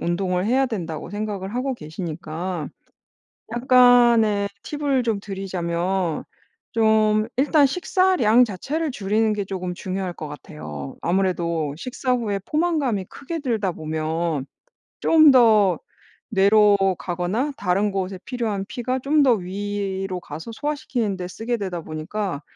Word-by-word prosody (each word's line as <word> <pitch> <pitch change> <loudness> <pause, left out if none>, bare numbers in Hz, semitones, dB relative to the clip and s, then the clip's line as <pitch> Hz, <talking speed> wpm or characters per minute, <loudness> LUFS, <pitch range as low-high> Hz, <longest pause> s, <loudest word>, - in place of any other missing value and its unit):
운동을 180 +1 0
해야 260 +4 +2
된다고 170 -9 -5
생각을 205 -1 -4
하고 265 +2 -1
계시니까 165 -1 -5 0.9
약간의 240 -5 +5 0.2
팁을 285 -3 0
좀 225 -3 0
드리자면 185 -3 -2 0.5
좀 215 -1 +3
일단 290 +1 +4
식사량 275 - +3
자체를 285 - -3
줄이는 215 -1 +1
게 205 -1 -2
쪼금 185 -2 -4
중요할 185 0 -4
것 155 -3 -7
같아요. 75 - -8
아무래도 170 -4 0
식사 255 +3 -2
후에 215 -5 0
포만감이 300 - 0
크게 325 +4 -6
들다 220 - -1
보면 155 -1 -2 0.6
좀 310 -3 +6
더 215 - +5 0.5
뇌로 205 0 +5 0.2
가거나 185 - -1
다른 200 +2 +1
곳에 190 -1 -3
필요한 225 -6 -2
피가 255 +1 -2
좀 290 +3 +3
더 255 -3 +5
위로 195 -1 -3
가서 160 +7 -8
소화시키는 245 -7 -2
데 180 -1 -5
쓰게 230 +6 -3
되다 185 -5 -4
보니까 155 +1 -4
200 Hz, 270 characters per minute, -23 LUFS, 180-245 Hz, 0.9 s, 좀